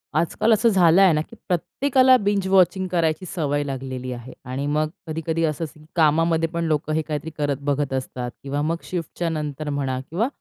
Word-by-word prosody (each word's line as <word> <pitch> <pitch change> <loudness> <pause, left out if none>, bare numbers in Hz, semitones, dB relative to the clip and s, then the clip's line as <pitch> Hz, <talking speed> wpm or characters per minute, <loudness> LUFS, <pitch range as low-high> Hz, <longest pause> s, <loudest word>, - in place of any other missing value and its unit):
आजकाल 215 +7 +2
असं 230 +2 +4
झालंय 185 -1 +5
ना 155 - +1
की 195 - -11
प्रत्येकाला 260 - +3
बिंज 200 -3 0
वॉचिंग 190 0 +3
करायची 170 0 0
सवय 145 -3 0
लागलेली 130 -2 -5
आहे. 120 +1 -9
आणि 130 +3 -3
मग 150 +1 +1 0.2
कधी-कधी 160 +1 -2
असंच 155 0 -3 0.2
कामामध्ये 165 0 +3
पण 170 0 -2
लोकं 155 -1 0
हे 160 - +1
काहीतरी 155 0 -4
करत 145 -2 0
बघत 145 -1 -1
असतात 125 -2 -3
किंवा 140 +1 -2
मग 160 +3 0
शिफ्टच्या 170 -1 -3
नंतर 150 -1 -4
म्हणा 135 -3 -1
किंवा 195 +9 0
155 Hz, 175 wpm, -23 LUFS, 145-175 Hz, 0.2 s, झालंय